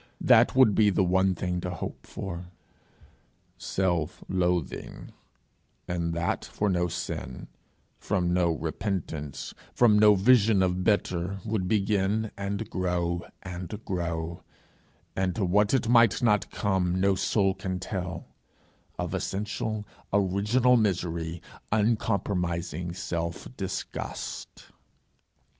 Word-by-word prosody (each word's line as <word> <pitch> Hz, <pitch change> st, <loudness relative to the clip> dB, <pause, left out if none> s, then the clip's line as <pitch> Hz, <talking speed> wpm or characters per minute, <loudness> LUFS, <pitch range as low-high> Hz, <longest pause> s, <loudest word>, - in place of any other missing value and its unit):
that -, -, +5 dB
would 130 Hz, -5 st, +6 dB
be 105 Hz, +1 st, +5 dB
the 95 Hz, -1 st, +2 dB
one 95 Hz, +1 st, +2 dB
thing 90 Hz, 0 st, -2 dB
to 90 Hz, -, -3 dB
hope 90 Hz, -2 st, -6 dB
for. 90 Hz, -2 st, -6 dB, 1.1 s
Self 90 Hz, -5 st, -1 dB
loathing, 90 Hz, -3 st, -2 dB, 0.8 s
and 85 Hz, -1 st, -1 dB
that 85 Hz, 0 st, -1 dB
for 105 Hz, -1 st, -1 dB
no 90 Hz, -1 st, +1 dB
sin, 65 Hz, -5 st, -5 dB, 0.5 s
from 90 Hz, -3 st, 0 dB
no 90 Hz, -1 st, +3 dB
repentance, 80 Hz, -2 st, -4 dB, 0.2 s
from 110 Hz, -4 st, +5 dB
no 105 Hz, -1 st, +7 dB
vision 105 Hz, -1 st, +5 dB
of 90 Hz, 0 st, 0 dB
better, 95 Hz, -2 st, 0 dB
would 105 Hz, -4 st, -1 dB
begin 105 Hz, +1 st, +1 dB
and 100 Hz, 0 st, -3 dB
grow 90 Hz, -2 st, -1 dB, 0.2 s
and 90 Hz, +2 st, -6 dB
grow; 85 Hz, -2 st, -3 dB, 0.7 s
and 95 Hz, -1 st, 0 dB
to 105 Hz, -4 st, 0 dB
what 100 Hz, +3 st, +3 dB
it 130 Hz, -4 st, +2 dB
might 115 Hz, 0 st, +5 dB
not 105 Hz, -3 st, +3 dB
come 95 Hz, -3 st, 0 dB
no 100 Hz, +1 st, +3 dB
soul 95 Hz, 0 st, +2 dB
can 95 Hz, -1 st, -4 dB
tell 90 Hz, -3 st, -4 dB, 0.7 s
of -, -, -3 dB
essential, 105 Hz, +1 st, -3 dB, 0.3 s
original 105 Hz, +6 st, +3 dB
misery, 85 Hz, -5 st, -1 dB, 0.3 s
uncompromising 95 Hz, -6 st, 0 dB
self 85 Hz, -1 st, -4 dB
disgust! 95 Hz, -4 st, -6 dB
95 Hz, 115 wpm, -27 LUFS, 90-105 Hz, 1.1 s, no